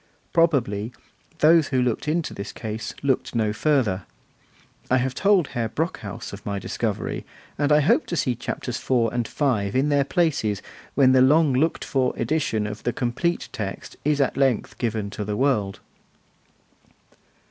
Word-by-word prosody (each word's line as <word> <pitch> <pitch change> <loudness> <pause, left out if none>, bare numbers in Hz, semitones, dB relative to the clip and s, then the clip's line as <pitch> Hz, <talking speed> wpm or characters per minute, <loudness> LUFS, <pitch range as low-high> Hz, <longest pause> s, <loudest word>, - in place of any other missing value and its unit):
Probably, 125 -10 +2 0.5
those 160 0 +6
who 130 - 0
looked 125 +3 0
into 160 +1 -1
this 100 0 -6
case 110 0 -5
looked 135 -3 0
no 110 -2 +1
further. 115 - +1 0.8
I 130 - +4
have 130 0 0
told 195 -4 +3
Herr 115 -2 -2
Brockhaus 115 - -4
of 100 - -9
my 100 -1 -3
discovery, 100 - -3 0.3
and 145 0 0
I 150 0 +6
hope 145 - +3
to 175 - -2
see 130 -3 +1
Chapters 120 +1 -4
IV. 120 -3 +1
and 120 -2 -1
V. 115 -7 0
in 140 +3 +2
their 145 -1 +3
places 140 - 0 0.3
when 135 -2 +5
the 130 0 +5
long 150 +2 +5
looked 155 +6 +1
for 130 -2 0
edition 135 -9 0
of 105 0 -5
the 120 - -1
complete 135 +8 -1
text 100 -3 -6
is 150 0 +1
at 140 - +1
length 135 -4 +1
given 110 -4 -2
to 105 - -4
the 105 0 -3
world. 110 -8 +1
130 Hz, 160 wpm, -24 LUFS, 110-145 Hz, 0.8 s, those